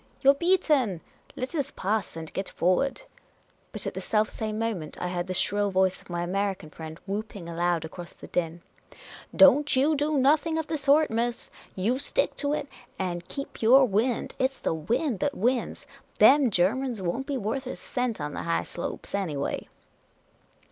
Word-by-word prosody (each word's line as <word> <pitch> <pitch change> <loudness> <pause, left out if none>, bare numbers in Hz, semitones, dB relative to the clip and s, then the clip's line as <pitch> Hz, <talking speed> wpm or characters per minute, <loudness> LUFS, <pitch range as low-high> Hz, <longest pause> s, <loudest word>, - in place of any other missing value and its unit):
You 275 - +7
're - - +1
beaten! 290 - +2 0.4
I,et 255 +5 -4
us 285 -4 -1
pass 205 -1 -2
and 160 -1 -7
get 195 - -3
forward! 230 - +1 0.3
" - - -38
But - - -4
at - - -3
the - - -5
self 215 -1 +1
same 215 -1 -4
moment, 215 -9 -3
I 180 - -2
heard 175 0 -3
the 185 - -2
shrill 205 +2 +1
voice 190 -1 +1
of - - -21
my 175 0 -2
American 190 -3 -2
friend 160 0 -8
whooping 200 -2 -5
aloud 170 0 0
across 170 +2 -9
the - - -13
din: 170 -1 -2 0.3
" - - -16
Don't 285 +1 +6
you 285 +4 +3
do 295 +1 0
no 275 +4 +5
thing 320 +1 -3
of 320 - -1
the 315 - -3
sort, 290 +1 +4
miss! 235 +1 -2 0.2
You 225 +8 0
stick - - 0
to 285 -1 0
it, 295 - -2 0.3
and 175 -2 -3
keep 275 - -7
your 260 +4 +7
wind! 225 +3 0
It 260 +1 +2
's - - -14
the - - -1
wind 225 - -1
that 285 +4 -1
wins! 245 +4 0 0.3
Them 280 -2 +6
Germans 225 +6 +1
won't 190 +9 -2
be 285 -2 -1
worth 250 +4 -3
a - - -4
cent 245 -3 -3
on 150 0 -4
the - - -4
high 170 0 0
slopes, 170 - -6
anyway 160 -9 -2
220 Hz, 190 wpm, -27 LUFS, 180-275 Hz, 0.4 s, You